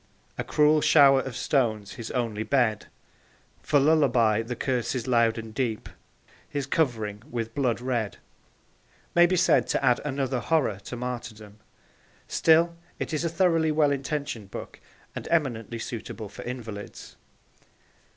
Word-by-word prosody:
A - - -3
cruel 150 0 +3
shower 140 -3 +6
of 130 -2 -7
stones 110 -7 0
his 115 -2 -7
only 115 -4 -2
bed, 110 -1 +1 0.7
For 145 -1 +2
lullaby 130 -8 +3
the 120 +2 -5
curses 125 -1 -2
loud 115 -3 +2
and 110 -1 -7
deep, 115 -3 -2 0.6
His 145 -2 -3
covering 110 -9 -1
with 115 -3 -4
blood 125 -4 0
red 120 -4 -2 1.0
may 175 0 +6
be 185 - +1
said 175 - +3
to - - 0
add 125 -1 +3
another 135 -3 -1
horror 125 -7 0
to - - -6
martyrdom. 115 -4 -7 0.7
Still 165 +1 +3 0.2
it - - -4
is 155 - -1
a 170 - 0
thoroughly 165 -2 +2
well 150 -1 +3
intentioned 140 -6 -3
book - - -8 0.4
and - - -6
eminently 120 -8 0
suitable 110 -2 -6
for - - -10
invalids. 115 -4 -7
125 Hz, 140 wpm, -26 LUFS, 115-145 Hz, 1.0 s, shower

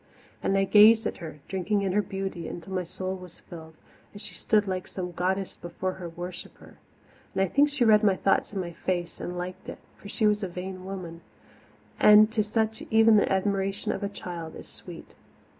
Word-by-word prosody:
And 195 - +1
I 195 - +3
gazed 215 +3 +6
at - - -2
her, 155 -4 -9
drinking 200 +2 -1
in 190 - 0
her 210 +3 +2
beauty 190 -3 -5
until 175 +2 -7
my 185 -1 -1
soul 185 +2 -5
was 180 -2 -11
filled, 160 -2 -11 0.4
as 205 - -10
she - - -7
stood 210 -2 +1
like 185 -1 -3
some 180 -2 -5
goddess 190 +2 -2
before 175 +2 -4
her 180 -2 -7
worshipper. 175 +1 -10 0.6
I 190 - +3
think 285 +10 +3
she 285 -4 +1
read 215 -1 +6
my 200 -2 +4
thought 195 - +1
in 200 - -4
my 175 -2 -4
face 175 0 -3
and 180 0 -5
liked 180 +1 -6
it - - -7 0.2
for 200 - -11
she 215 - 0
was 210 0 +3
a 195 - -2
vain 185 +1 -7
woman, 180 -3 -7 0.8
and 210 +1 +7
to 220 -1 +1
such 220 +1 -1
even 220 0 +6
the - - +2
admiration 195 0 0
of - - -4
a 200 - -2
child 170 -5 -7
is - - -10
sweet. - - -12
190 Hz, 200 wpm, -27 LUFS, 180-210 Hz, 0.8 s, and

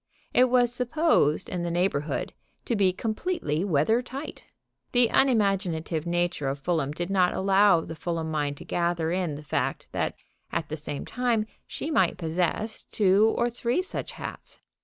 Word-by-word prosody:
It 250 - +6
was 245 -1 +4
supposed 250 - +2
in 180 - -3
the 175 - -2
neighborhood 170 -4 -1 0.3
to 235 - 0
be 195 -3 +3
completely 220 - -2
weather 195 +6 +2
tight. 265 +4 -8 0.5
The 245 -2 +4
unimaginative 190 - +1
nature 175 -4 0
of 135 - -2
Fulham 145 -1 -1
did 175 +5 -4
not 185 -2 +3
allow 195 -2 +4
the 165 - -7
Fulham 165 0 -3
mind 145 -2 -1
to - - -10
gather 170 -2 0
in 175 -4 -1
the 150 - -9
fact 145 - -2
that, - - -1 0.4
at 155 - -2
the 155 - -3
same 150 -2 -5
time, 240 -3 0 0.2
she 315 - -4
might 190 - +2
possess 180 +6 -2
two 205 +2 +3
or 235 - +2
three 245 +8 0
such 375 - -5
hats. - - -8
185 Hz, 160 wpm, -27 LUFS, 160-230 Hz, 0.5 s, It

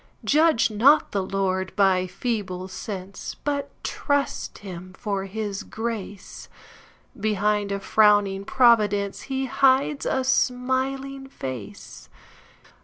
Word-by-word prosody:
Judge 305 -6 +3
not 255 +9 +4
the 200 - 0
Lord 190 -1 -2
by 190 -2 +3
feeble 185 -2 -3
sense, 190 0 -7
But 285 -1 -2
trust 285 -1 -2
him 185 0 -8
for 200 -4 -2
his 205 0 -4
grace; 215 -3 -6 0.7
Behind 210 -1 0
a 200 - -1
frowning 205 -1 +3
providenceHe 230 +3 +2
hides 270 +2 +2
a 265 - 0
smiling 265 +2 -1
face. 115 - -8
210 Hz, 100 wpm, -24 LUFS, 195-260 Hz, 0.7 s, not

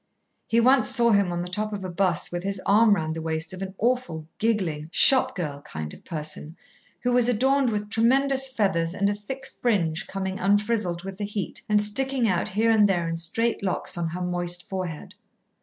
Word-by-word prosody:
He 230 - +2
once 255 +3 +4
saw 240 -2 +4
him 200 -3 +2
on 175 0 -2
the - - -6
top 210 +4 -3
of 200 -2 -5
a - - -4
bus 180 -1 0
with 175 0 -3
his 195 +1 -3
arm 210 +1 +5
round 160 -3 -3
the 165 - -5
waist 160 +1 -3
of 185 - -8
an 190 0 -6
awful, 225 -10 -1
giggling 180 -9 -1
shop 260 +3 +4
girl 150 -6 -4
kind 75 - -7
of - - -14
person, 155 0 -5 0.4
who 245 - 0
was 245 -1 +4
adorned 265 +3 +2
with 210 -1 -3
tremendous 265 +4 +2
feathers 190 -8 0
and 200 +1 +1
a - - -1
thick 260 +7 -8 0.2
fringe 175 -9 0
coming 190 -1 -4
unfrizzled 205 -3 0
with 195 +1 -8
the - - -3
heat 205 -2 -4
and 210 0 +4
sticking 260 +3 +2
out 180 -4 0
here 220 +4 +1
and 210 -2 +4
there 175 -3 0
in 165 - -2
straight 220 +8 0
locks 185 0 -1
on 170 -1 -2
her 175 +3 -5
moist 175 0 0
forehead. 185 -5 -5
200 Hz, 205 wpm, -25 LUFS, 175-230 Hz, 0.4 s, arm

